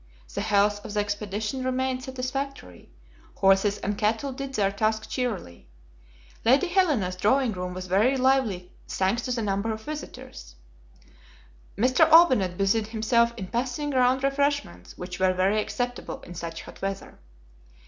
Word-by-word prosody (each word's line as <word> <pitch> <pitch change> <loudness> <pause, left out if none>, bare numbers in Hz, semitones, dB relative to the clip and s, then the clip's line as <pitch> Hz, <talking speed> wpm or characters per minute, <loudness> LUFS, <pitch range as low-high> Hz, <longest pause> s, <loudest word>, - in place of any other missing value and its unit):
The - - -2
health 205 -1 +2
of 210 - -7
the - - +2
expedition 205 +4 -3
remained 255 0 -1
satisfactory; 260 - -5 0.5
horses 195 +1 +3
and 205 +1 -2
cattle 225 +6 0
did 270 +1 -6
their 200 -2 +2
task 220 +2 -1
cheerily. 180 - -4 0.8
Lady 270 +10 +4
Helena's 295 - +2
drawing 240 +6 +2
room 180 -2 -5
was 185 0 -5
very 210 +9 +2
lively, 255 -9 +1 0.2
thanks 195 +5 0
to 255 - -2
the 235 -2 -1
number 200 +2 -1
of 220 0 -6
visitors. - - -8 1.2
M. 215 - -1
Olbinett 255 - +5
busied 205 +2 +1
himself 235 +1 +2
in 195 - -4
passing 250 +7 -2
round 255 0 +2
refreshments 275 - -1
which 180 0 -7
were 185 0 +3
very 195 +4 +2
acceptable 245 +3 -4
in 175 - -10
such 170 -1 -6
hot - - -13
weather. 195 0 -5
220 Hz, 145 wpm, -26 LUFS, 195-260 Hz, 1.2 s, Olbinett